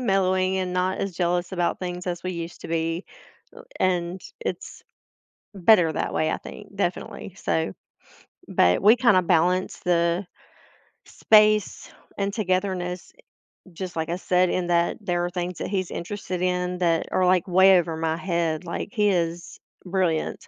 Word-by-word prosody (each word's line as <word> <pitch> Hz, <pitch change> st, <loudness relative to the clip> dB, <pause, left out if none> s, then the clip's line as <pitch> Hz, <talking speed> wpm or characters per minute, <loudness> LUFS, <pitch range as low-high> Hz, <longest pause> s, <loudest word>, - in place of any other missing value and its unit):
mellowing 190 Hz, -4 st, +1 dB
and 185 Hz, -1 st, -2 dB
not 180 Hz, +1 st, 0 dB
as 195 Hz, -2 st, -3 dB
jealous 175 Hz, +1 st, -1 dB
about 175 Hz, -2 st, 0 dB
things 180 Hz, 0 st, -5 dB
as 175 Hz, -1 st, -3 dB
we 185 Hz, -, -3 dB
used 170 Hz, 0 st, -7 dB
to -, -, -8 dB
be, 165 Hz, +2 st, -1 dB, 0.8 s
and 180 Hz, 0 st, 0 dB, 0.2 s
it's -, -, -6 dB, 0.8 s
better 180 Hz, -4 st, +5 dB
that -, -, -3 dB
way, 155 Hz, 0 st, +1 dB
I -, -, -1 dB
think, 205 Hz, -1 st, -12 dB
definitely, 185 Hz, -1 st, -3 dB
so, 160 Hz, -, -1 dB, 0.8 s
but 90 Hz, 0 st, +3 dB
we 215 Hz, +4 st, +7 dB
kinda 235 Hz, -6 st, +4 dB
balance 180 Hz, +2 st, +1 dB
the 170 Hz, +1 st, +1 dB, 0.8 s
space 215 Hz, -1 st, +3 dB, 0.3 s
and 200 Hz, 0 st, -1 dB
togetherness, 185 Hz, -3 st, -2 dB, 0.6 s
just 185 Hz, +1 st, -6 dB
like 160 Hz, -1 st, -2 dB
I 175 Hz, -, -1 dB
said, 180 Hz, -1 st, +2 dB
in 180 Hz, -1 st, -1 dB
that 170 Hz, 0 st, +1 dB
there 175 Hz, -3 st, -1 dB
are 175 Hz, -, -2 dB
things 180 Hz, 0 st, -4 dB
that -, -, -3 dB
he's 185 Hz, -2 st, -2 dB
interested 185 Hz, 0 st, -5 dB
in 180 Hz, 0 st, -1 dB
that 165 Hz, -2 st, +1 dB
are, 185 Hz, -, +3 dB
like, 180 Hz, -1 st, +3 dB
way 190 Hz, +1 st, +6 dB
over 165 Hz, -1 st, -3 dB
my 160 Hz, 0 st, -1 dB
head, 170 Hz, -2 st, -1 dB
like, 170 Hz, -, -4 dB
he 210 Hz, -1 st, +2 dB
is 170 Hz, -2 st, -2 dB, 0.3 s
brilliant, 180 Hz, -4 st, -1 dB
180 Hz, 155 wpm, -24 LUFS, 170-190 Hz, 0.8 s, we